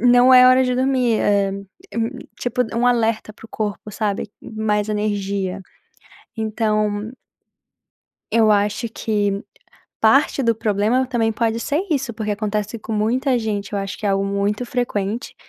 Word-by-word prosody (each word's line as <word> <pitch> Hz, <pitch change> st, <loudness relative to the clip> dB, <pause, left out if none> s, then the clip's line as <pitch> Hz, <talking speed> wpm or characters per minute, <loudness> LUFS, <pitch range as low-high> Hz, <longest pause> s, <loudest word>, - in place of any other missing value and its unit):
não 245 Hz, +2 st, +6 dB
é 255 Hz, 0 st, +9 dB
hora 255 Hz, +1 st, +6 dB
de 250 Hz, 0 st, 0 dB
dormir". 255 Hz, -3 st, +1 dB
É 200 Hz, -1 st, +2 dB, 0.5 s
hum, 230 Hz, 0 st, 0 dB, 0.3 s
tipo 250 Hz, 0 st, 0 dB
um 245 Hz, +1 st, +2 dB
alerta 225 Hz, -3 st, +1 dB
para 220 Hz, -, -18 dB
o -, -, -36 dB
corpo, 210 Hz, -1 st, -4 dB
sabe. 205 Hz, -1 st, -2 dB
Mais 215 Hz, -1 st, -1 dB
energia. 200 Hz, -2 st, -2 dB, 0.8 s
Então 215 Hz, -1 st, -1 dB, 1.2 s
Eu 225 Hz, -1 st, +4 dB
acho 205 Hz, +2 st, +1 dB
que 205 Hz, -2 st, -1 dB, 0.6 s
parte 275 Hz, +6 st, +4 dB
do 230 Hz, -3 st, +2 dB
problema 220 Hz, +3 st, +1 dB
também 230 Hz, -3 st, +1 dB
pode 225 Hz, +1 st, 0 dB
ser 285 Hz, +8 st, -1 dB
isso, 275 Hz, -6 st, -1 dB
porque 215 Hz, -1 st, -3 dB
acontece 210 Hz, +1 st, -2 dB
com 220 Hz, +1 st, -7 dB
muita 245 Hz, +5 st, +1 dB
gente 210 Hz, -3 st, -3 dB
eu 205 Hz, -, -1 dB
acho 195 Hz, -1 st, -5 dB
que 210 Hz, -, -3 dB
é -, -, +2 dB
algo 195 Hz, 0 st, +1 dB
muito 200 Hz, +3 st, -1 dB
frequente, 235 Hz, -1 st, -2 dB
220 Hz, 150 wpm, -21 LUFS, 205-240 Hz, 1.2 s, é